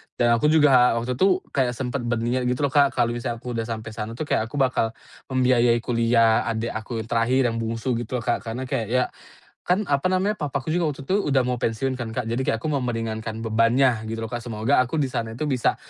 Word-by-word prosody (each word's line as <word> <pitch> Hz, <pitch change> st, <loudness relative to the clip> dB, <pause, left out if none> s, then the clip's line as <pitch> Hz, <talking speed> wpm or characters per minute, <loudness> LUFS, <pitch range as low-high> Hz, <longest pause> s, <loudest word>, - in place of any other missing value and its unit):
Dan 120 Hz, -, +2 dB
aku 115 Hz, -, -1 dB
juga 145 Hz, -6 st, +5 dB
waktu 120 Hz, +2 st, -2 dB
tu 185 Hz, +3 st, +3 dB
kayak 130 Hz, -3 st, +1 dB
sempat 125 Hz, +1 st, -3 dB
berniat 120 Hz, +2 st, -1 dB
gitu 125 Hz, +3 st, -1 dB
loh, 140 Hz, -, +2 dB
Kak, 140 Hz, -1 st, +4 dB
kalau 120 Hz, -2 st, +2 dB
misalnya 120 Hz, -1 st, -4 dB
aku 125 Hz, -, -5 dB
udah 115 Hz, -, -2 dB
sampai 115 Hz, -1 st, -5 dB
sana 110 Hz, +1 st, -5 dB
tuh 140 Hz, -, -3 dB
kayak 125 Hz, -6 st, 0 dB
aku 115 Hz, -, -10 dB
bakal 130 Hz, -5 st, +1 dB, 0.3 s
membiayai 125 Hz, -3 st, +3 dB
kuliah 115 Hz, -2 st, +3 dB
adik 115 Hz, 0 st, -2 dB
aku 110 Hz, +1 st, -4 dB
yang 110 Hz, -, -10 dB
terakhir 120 Hz, +3 st, +2 dB
yang 115 Hz, -, -3 dB
bungsu 115 Hz, +2 st, -2 dB
gitu 120 Hz, +1 st, -3 dB
loh, -, -, -10 dB
Kak. 120 Hz, -, -1 dB
Karena 115 Hz, +3 st, -4 dB
kayak, 125 Hz, -6 st, -1 dB
ya 125 Hz, 0 st, +4 dB, 0.6 s
kan 185 Hz, +4 st, +2 dB
apa 140 Hz, +4 st, +1 dB
namanya, 190 Hz, +3 st, +1 dB
papaku 140 Hz, -6 st, -4 dB
juga 175 Hz, -2 st, +1 dB
waktu 140 Hz, -1 st, -9 dB
itu 190 Hz, -, +2 dB, 0.2 s
udah 135 Hz, -1 st, +3 dB
mau 125 Hz, -, 0 dB
pensiun 130 Hz, +4 st, -1 dB
kan, 120 Hz, -3 st, -5 dB
Kak. 125 Hz, +2 st, -2 dB
Jadi 115 Hz, +2 st, -1 dB
kayak 115 Hz, -, 0 dB
aku 140 Hz, -, -4 dB
mau 140 Hz, -, +1 dB
meringankan 115 Hz, -2 st, -3 dB
bebannya, 115 Hz, +1 st, +2 dB
gitu 115 Hz, +1 st, -4 dB
loh, 115 Hz, -, -6 dB
Kak. 120 Hz, -, -3 dB
Semoga 115 Hz, +4 st, +1 dB
aku 125 Hz, +6 st, -5 dB
di 140 Hz, -, +1 dB
sana 115 Hz, -2 st, -3 dB
itu 130 Hz, -, -4 dB
bisa 130 Hz, -4 st, +1 dB
120 Hz, 235 wpm, -24 LUFS, 115-135 Hz, 0.6 s, juga